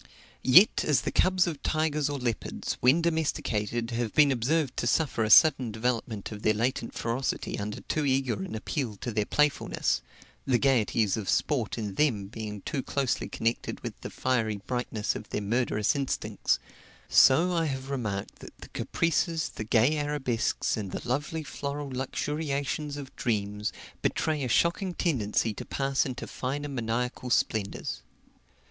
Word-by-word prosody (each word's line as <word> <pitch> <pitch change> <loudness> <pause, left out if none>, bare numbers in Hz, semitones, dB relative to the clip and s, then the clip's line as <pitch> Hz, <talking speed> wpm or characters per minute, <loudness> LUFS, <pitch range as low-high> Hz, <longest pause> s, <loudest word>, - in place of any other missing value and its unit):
Yet, 180 +12 +6
as 150 -3 +3
the - - -2
cubs 185 -1 +3
of 155 -5 -4
tigers 155 -2 0
or 145 - -2
leopards, 120 -4 -3
when 140 +7 +4
domesticated, 120 -8 -1
have 115 -2 -2
been 150 -2 +6
observed 135 +3 +1
to 120 - 0
suffer 125 -3 +1
a 110 - 0
sudden 130 -1 +6
development 110 -2 -2
of 105 -1 -7
their 110 0 +2
latent 115 +1 -1
ferocity 120 0 -2
under 105 +1 -4
too 155 - -1
eager 130 -6 +1
an 95 - -5
appeal 115 0 -3
to 120 +5 -5
their 105 -1 0
playfulness 150 -1 +1 0.4
the 130 -2 +2
gaieties 115 -6 +2
of 105 -3 -4
sport 125 -9 0
in 105 -3 -3
them 105 -6 +1
being 105 -2 -6
too 140 - -2
closely 135 -1 -1
connected 115 +1 -2
with - - -7
the - - -5
fiery 115 -5 0
brightness 120 -4 -2
of 105 - -7
their - - -2
murderous 105 +1 +1
instincts 140 -2 0 0.5
so 165 +7 +6
I 165 -1 +1
have 135 -2 -4
remarked 105 -8 -3
that - - -12
the - - -12
caprices, 165 -1 0
the - - -6
gay 120 +8 +3
arabesques, 145 -6 0
and 100 -4 -4
the - - -5
lovely 145 +5 -1
floral 145 -1 -5
luxuriations 145 +2 -2
of 140 -2 -9
dreams, 105 -3 -1 0.3
betray 155 -3 0
a - - -1
shocking 170 - +1
tendency 115 - 0
to - - -7
pass 135 0 0
into 130 -1 -5
finer 145 +3 -4
maniacal 125 0 -2
splendors. 110 -4 0
130 Hz, 155 wpm, -28 LUFS, 110-145 Hz, 0.5 s, Yet